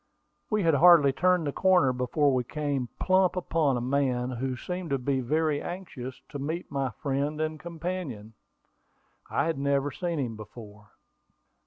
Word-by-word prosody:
We 215 -2 +1
had 165 -1 +3
hardly 150 -2 +7
turned 180 +1 +2
the 145 - -1
corner 180 -6 +3
before 135 +3 +1
we 125 -1 +1
came 140 -2 -2
plump 185 -1 +3
upon 160 -7 +1
a - - -2
man 130 -1 0
who 130 +1 -3
seemed 180 +4 -5
to 140 - +1
be 135 +1 -1
very 150 +3 0
anxious 145 -9 -7
to 145 - -6
meet 160 +5 -4
my 135 -2 -1
friend 140 +5 -2
and 155 0 -2
companion. 165 - -5 1.0
I 140 - +1
had 165 -4 -1
never 140 0 +1
seen 170 +1 -3
him 125 -6 -2
before. 105 -1 -12
140 Hz, 160 wpm, -28 LUFS, 130-165 Hz, 1.0 s, hardly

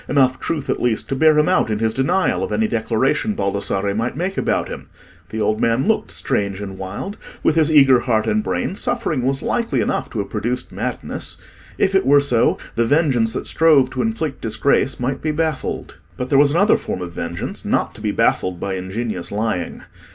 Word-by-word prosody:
Enough 130 -2 +3
truth, 150 -4 -3
at - - -1
least, 120 -3 0
to 135 - -1
bear 155 +2 +4
him 150 - +4
out 180 -10 +2
in 105 - 0
his 110 0 0
denial 135 +9 +1
of - - -3
any 220 - +1
declaration 135 - 0
Baldassarre 100 0 -1
might 115 +5 -2
make 185 +4 -2
about - - 0
him? - - -8 0.4
The 110 - -5
old 110 0 0
man 115 - +1
looked 220 - +1
strange 95 +4 -2
and 95 -2 -7
wild; 100 - -6 0.3
with - - +3
his 160 -1 +4
eager 135 -4 +6
heart 110 -3 0
and 215 - +1
brain, - - -2
suffering 200 - -1
was 135 +2 -1
likely 235 -1 0
enough - - -1
to - - -7
have - - -3
produced - - -2
madness. - - -4 0.4
If 190 - +2
it 195 0 +4
were 145 +1 +7
so, 125 -5 +2 0.2
the 115 0 +1
vengeance 130 -6 +2
that - - -4
strove 150 -5 +4
to - - -2
inflict 165 -11 -2
disgrace 130 +4 +1
might 130 +2 -2
be 155 - -1
baffled. 155 -2 -2 0.2
But 125 0 -4
there 140 - +4
was 145 0 +6
another 175 +8 +4
form 90 - -4
of 85 -1 -7
vengeance - - -4
not - - 0
to - - -12
be - - -1
baffled 90 -2 +1
by 95 0 -3
ingenious 95 0 -4
lying. 105 -4 -2
130 Hz, 205 wpm, -20 LUFS, 110-155 Hz, 0.4 s, were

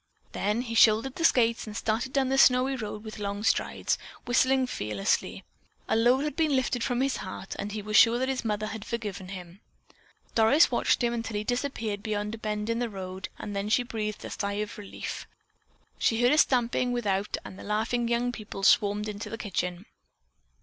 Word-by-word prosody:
Then 210 +4 0
he 230 -2 -5
shouldered 225 +3 +5
the 330 - -5
skates 230 -7 +3
and 215 0 -6
started 230 +4 -1
down 265 -1 +1
the 270 - +1
snowy 255 +1 +5
road 215 -3 -6
with 215 -1 -8
long 200 0 -3
strides, - - 0 0.3
whistling 260 +2 +3
fearlessly. 105 - -1 0.4
A - - +1
load 245 +4 +4
had 300 -2 -3
been 310 -4 +2
lifted 250 -2 0
from 245 -1 0
his 270 0 +1
heart 190 0 -7
and 205 - -3
he 210 0 -5
was 215 +1 -3
sure 230 +1 +7
that 260 +1 0
his 265 -1 -2
mother 215 -1 -1
had 215 -1 -6
forgiven 205 -5 -5
him. 180 -1 -9 0.7
Doris 230 +8 +5
watched - - +2
him 240 0 +1
until 225 -2 -3
he 210 - -2
disappeared 230 -4 -2
beyond 210 0 -2
a 225 - -7
bend 210 -1 -3
in 230 0 0
the 240 -1 -1
road 190 -2 -6
and 205 - -6
then 200 +1 -2
she 245 +3 +3
breathed 215 -3 -4
a - - -7
sigh 200 -1 -2
of 210 +1 -4
relief. 205 - -6 0.7
She 225 - +2
heard 245 - +5
a 300 - +4
stamping 245 -1 +2
without 205 -5 -1
and 190 - -9
the - - -9
laughing 225 +3 0
young 240 +1 +1
people 215 -4 -8
swarmed 205 +1 +4
into 210 0 -5
the 225 - -5
kitchen. 180 -3 -3
220 Hz, 200 wpm, -28 LUFS, 205-245 Hz, 0.7 s, sure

